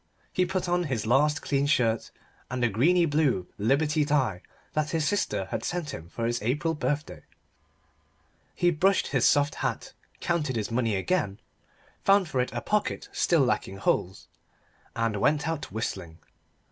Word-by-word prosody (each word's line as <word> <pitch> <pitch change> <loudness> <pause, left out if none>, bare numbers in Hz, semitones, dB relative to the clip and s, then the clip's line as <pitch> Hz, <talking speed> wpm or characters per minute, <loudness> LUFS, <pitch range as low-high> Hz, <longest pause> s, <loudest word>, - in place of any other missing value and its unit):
He 180 0 +2
put 185 0 -2
on 175 0 +1
his 130 -8 -2
last 145 +6 +2
clean 140 0 +1
shirt 115 -6 +1 0.4
and 125 0 -2
the 120 - +3
greeny 170 - +3
blue 145 - +1
Liberty 150 +7 +2
tie 130 - +1 0.3
that 155 0 0
his 160 -2 0
sister 105 - 0
had - - -2
sent 175 -5 -3
him 80 +1 -8
for 115 +5 -4
his 120 +1 -1
April 145 +9 0
birthday. 150 -1 -3 1.3
He 175 - +3
brushed 190 +5 +2
his 135 -3 +3
soft 145 0 +3
hat - - -3 0.3
counted 150 -7 -1
his 110 -1 -2
money 115 -3 +1
again 100 - -1 0.6
found 195 -2 +4
for 130 - +1
it 125 - -2
a - - -3
pocket 210 -1 -1
still 170 -4 +2
lacking 110 -6 0
holes 95 -2 -1 0.7
and 115 -2 0
went 145 +8 +2
out 160 -2 -3
whistling. 95 -7 -4
145 Hz, 160 wpm, -27 LUFS, 115-160 Hz, 1.3 s, found